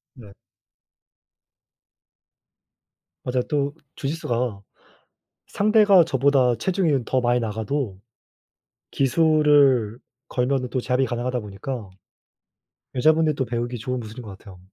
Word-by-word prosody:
네. 110 Hz, -6 st, -14 dB, 2.9 s
맞아요. 125 Hz, 0 st, 0 dB
또 145 Hz, -1 st, -1 dB, 0.2 s
주짓수가 125 Hz, -8 st, -3 dB, 0.9 s
상대가 205 Hz, -3 st, +4 dB
저보다 135 Hz, -3 st, +2 dB
체중이 170 Hz, -, 0 dB
더 130 Hz, +3 st, 0 dB
많이 120 Hz, 0 st, +1 dB
나가도 110 Hz, 0 st, -3 dB, 0.9 s
기술을 140 Hz, -5 st, +3 dB, 0.3 s
걸면은 125 Hz, 0 st, -1 dB
또 130 Hz, -, -1 dB
제압이 125 Hz, +2 st, 0 dB
가능하다 125 Hz, +1 st, -2 dB
보니까 105 Hz, +1 st, -7 dB, 1.0 s
여자분들도 155 Hz, +1 st, +2 dB
배우기 120 Hz, +1 st, -3 dB
좋은 125 Hz, +3 st, -3 dB
기술인 115 Hz, +2 st, -9 dB
거 110 Hz, -, -11 dB
같아요. 95 Hz, -1 st, -13 dB
125 Hz, 235 characters per minute, -23 LUFS, 120-145 Hz, 2.9 s, 상대가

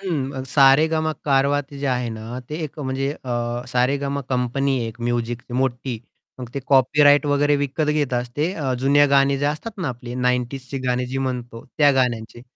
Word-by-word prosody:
हं. 140 Hz, -8 st, -3 dB
सारेगामा 155 Hz, +4 st, +4 dB
कारवा 140 Hz, 0 st, +2 dB
ते 140 Hz, +1 st, -12 dB
जे 140 Hz, -, -2 dB
आहे 125 Hz, -2 st, 0 dB
ना 110 Hz, +2 st, -6 dB
ते 150 Hz, -, -4 dB
एक 150 Hz, 0 st, -9 dB
म्हणजे 135 Hz, 0 st, -2 dB
अ, 120 Hz, -2 st, -4 dB
सारेगाम 140 Hz, +3 st, 0 dB
कंपनी 130 Hz, +1 st, 0 dB
एक 115 Hz, +2 st, -9 dB
म्युझिकची 120 Hz, +1 st, -3 dB
मोठी. 125 Hz, -2 st, -1 dB, 0.4 s
मग 125 Hz, -, -6 dB
ते 140 Hz, -, -2 dB
कॉपीराइट 145 Hz, +2 st, +5 dB
वगैरे 145 Hz, 0 st, +2 dB
विकत 145 Hz, +2 st, -1 dB
घेतात 130 Hz, -5 st, 0 dB
ते 155 Hz, +5 st, 0 dB, 0.3 s
जुनी 145 Hz, +2 st, +5 dB
गाणी 140 Hz, 0 st, +3 dB
जे 145 Hz, -, -2 dB
असतात 155 Hz, +10 st, -3 dB
ना 165 Hz, -, -2 dB
आपली 120 Hz, -1 st, -7 dB
90sची 125 Hz, +1 st, -1 dB
ची 135 Hz, -, -3 dB
गाणी 125 Hz, 0 st, 0 dB
जी 135 Hz, +2 st, -3 dB
म्हणतो 125 Hz, -3 st, -4 dB
त्या 145 Hz, -1 st, +6 dB
गाण्यांची. 120 Hz, -2 st, -2 dB
135 Hz, 170 wpm, -22 LUFS, 125-145 Hz, 0.4 s, त्या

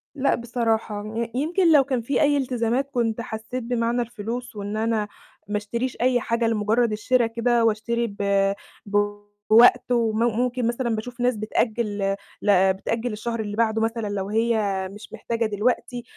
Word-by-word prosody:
لأ 275 Hz, 0 st, +2 dB
بصراحة، 225 Hz, -3 st, -1 dB
ي 230 Hz, 0 st, -2 dB
يمكن 330 Hz, +5 st, +2 dB
لو 290 Hz, -3 st, +7 dB
كان 260 Hz, -3 st, -1 dB
في 275 Hz, +5 st, 0 dB
أي 290 Hz, -1 st, +4 dB
التزامات 250 Hz, +1 st, 0 dB
كنت 235 Hz, -2 st, 0 dB
حسّيت 230 Hz, +2 st, -5 dB
بمعنى 235 Hz, 0 st, 0 dB
الفلوس 235 Hz, +1 st, -5 dB
وإن 205 Hz, +1 st, -4 dB
أنا 220 Hz, -1 st, 0 dB, 0.4 s
ما 210 Hz, 0 st, -1 dB
اشتريش 235 Hz, +5 st, -3 dB
أي 250 Hz, 0 st, +3 dB
حاجة 230 Hz, +1 st, 0 dB
لمجرّد 225 Hz, +1 st, +1 dB
الشرا 230 Hz, +3 st, +2 dB
كده 235 Hz, 0 st, +1 dB
وأشتري 235 Hz, +2 st, 0 dB
ب 200 Hz, -1 st, +1 dB, 0.3 s
بوقت 205 Hz, +4 st, +3 dB
وم 225 Hz, -2 st, +1 dB
ممكن 240 Hz, +1 st, +1 dB
مثلًا 235 Hz, -1 st, -1 dB
باشوف 240 Hz, +3 st, -7 dB
ناس 245 Hz, -1 st, +2 dB
بتأجّل 210 Hz, -2 st, -1 dB, 0.3 s
ل 190 Hz, -2 st, +4 dB
بتأجّل 230 Hz, +5 st, -3 dB
للشهر 230 Hz, +2 st, -4 dB
اللي 205 Hz, 0 st, -4 dB
بعده 225 Hz, -1 st, +1 dB
مثلًا 225 Hz, -1 st, -1 dB
لو 200 Hz, -1 st, -3 dB
هي 225 Hz, +2 st, +1 dB, 0.4 s
مش 210 Hz, +2 st, -12 dB
محتاجة 230 Hz, +1 st, -2 dB
دلوقتي، 240 Hz, +3 st, -1 dB
230 Hz, 155 wpm, -24 LUFS, 210-245 Hz, 0.4 s, لو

